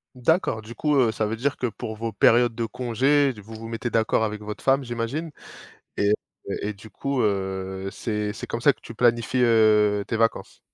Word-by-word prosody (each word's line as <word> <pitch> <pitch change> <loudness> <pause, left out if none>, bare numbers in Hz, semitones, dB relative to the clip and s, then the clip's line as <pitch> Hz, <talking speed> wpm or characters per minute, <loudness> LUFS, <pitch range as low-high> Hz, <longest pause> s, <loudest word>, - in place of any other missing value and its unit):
D'accord, 125 -3 +1
du 115 +2 -9
coup, 150 +5 0
heu, 125 -5 +4
ça 110 - -1
veut 110 - -2
dire 140 +5 -1
que 125 - -1
pour 110 0 -6
vos 115 +1 -4
périodes 120 +1 +4
de 115 0 -1
congés, 130 +4 +1
d 105 - -12
vous 110 +3 -12
vous 110 +1 -8
mettez 115 +1 -3
d'accord 110 0 +2
avec 105 -1 -3
votre 105 0 -7
femme, 135 +1 +3
j'imagine 120 +7 -3 0.7
et 100 +1 +2 0.5
et 105 - -2
du 105 +2 -14
coup, 140 +6 -2
heu, 95 -2 -2
c'est 105 -2 -2
c'est - - -8
comme 115 - -3
ça 145 - +5
que - - -26
tu 115 - -10
planifies, 120 +2 +2
heu, 105 -3 +4
tes 115 - -1
vacances? 115 0 -1
115 Hz, 205 wpm, -24 LUFS, 105-125 Hz, 0.7 s, ça